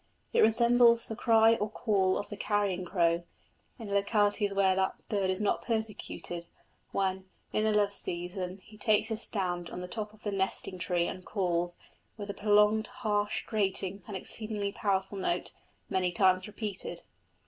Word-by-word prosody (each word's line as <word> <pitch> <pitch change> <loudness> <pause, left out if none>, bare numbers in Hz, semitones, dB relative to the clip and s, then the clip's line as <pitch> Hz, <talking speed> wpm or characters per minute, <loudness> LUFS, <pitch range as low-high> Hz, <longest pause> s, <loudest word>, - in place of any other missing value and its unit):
It - - +4
resembles 235 +1 +5
the 225 - -5
cry 225 -1 +5
or 210 - -1
call 195 -4 +1
of 205 - -4
the 210 - -5
carrion 200 -3 0
crow, 170 -2 +2 0.6
in 215 -5 -6
localities 205 0 +2
where 195 -1 +3
that 190 0 -1
bird 200 -3 +1
is 185 +1 0
not 210 - +1
persecuted, 210 -6 -3 0.4
when, 190 -1 -1 0.3
in 215 - +2
the 220 - +3
love 205 -1 +2
season, 180 +1 -4
he 215 0 -16
takes 215 +1 +2
his 220 0 -2
stand 175 -6 -1
on - - -7
the 180 - -5
top 210 +2 -5
of 215 0 -20
the 205 - -2
nesting 190 -1 -2
tree 175 0 +1
and 185 - -6
calls 175 -3 -1 0.4
with 205 -1 -4
a - - -8
prolonged, 210 +1 +4
harsh, 210 -3 -1
grating, 195 -2 -1
and 205 -3 -4
exceedingly 210 0 -3
powerful 195 -1 -1
note, 180 -1 -1 0.4
many 185 -2 +1
times 185 +1 +3
repeated. 210 -2 -5
200 Hz, 165 wpm, -30 LUFS, 185-215 Hz, 0.6 s, resembles